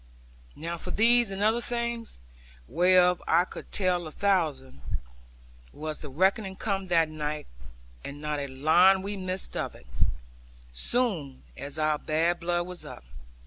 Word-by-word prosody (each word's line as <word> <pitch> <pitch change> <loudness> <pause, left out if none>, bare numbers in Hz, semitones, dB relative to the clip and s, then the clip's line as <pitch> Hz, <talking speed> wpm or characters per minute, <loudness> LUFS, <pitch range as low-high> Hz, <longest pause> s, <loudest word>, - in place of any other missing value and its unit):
Now 170 +2 -5
for 180 - -7
these 235 +3 +5
and 195 +1 -3
other 225 +3 +3
things 235 -1 -3 0.5
(whereof 180 +1 +4
I 175 - +4
could - - -10
tell 180 -3 0
a - - -8
thousand) 155 - 0 0.9
was 155 - -5
the 150 - -7
reckoning 190 - +1
come 195 -1 -2
that 165 -2 +3
night; 150 -1 -4 0.6
and 140 +1 -7
not 150 0 -2
a 140 - -3
line 175 +8 +4
we 205 +1 -3
missed 185 -1 -4
of - - -3
it; - - -16 0.9
soon 165 - 0
as 140 +3 -6
our 155 -1 +1
bad 165 +3 +1
blood 175 0 0
was 180 -1 -7
up. - - -10
175 Hz, 145 wpm, -28 LUFS, 150-195 Hz, 0.9 s, these